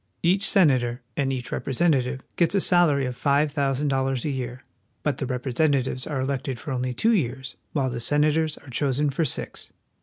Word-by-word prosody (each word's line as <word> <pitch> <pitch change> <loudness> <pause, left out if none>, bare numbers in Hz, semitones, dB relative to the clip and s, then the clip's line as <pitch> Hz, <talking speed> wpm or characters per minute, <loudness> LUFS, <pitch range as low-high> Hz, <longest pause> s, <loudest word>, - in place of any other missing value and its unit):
Each 190 +3 +2
senator 130 -9 +2
and 135 -1 0
each 125 -2 -4
representative 135 -2 0
gets 170 +3 +3
a - - +4
salary 170 -7 +4
of 125 -1 -4
five 145 +3 +2
thousand 140 -1 0
dollars 135 -2 0
a 150 - 0
year; 125 -1 -5 0.4
but 150 - -1
the 135 - -2
representatives 130 0 0
are 145 -3 -2
elected 130 -1 -3
for 150 - -6
only 125 -1 -2
two 225 - +3
years, 130 - -2 0.2
while 135 -4 0
the 120 - -4
senators 150 +4 +1
are 145 - -15
chosen 140 +2 +1
for 160 +4 0
six. 130 - -5
135 Hz, 180 wpm, -25 LUFS, 130-150 Hz, 0.4 s, a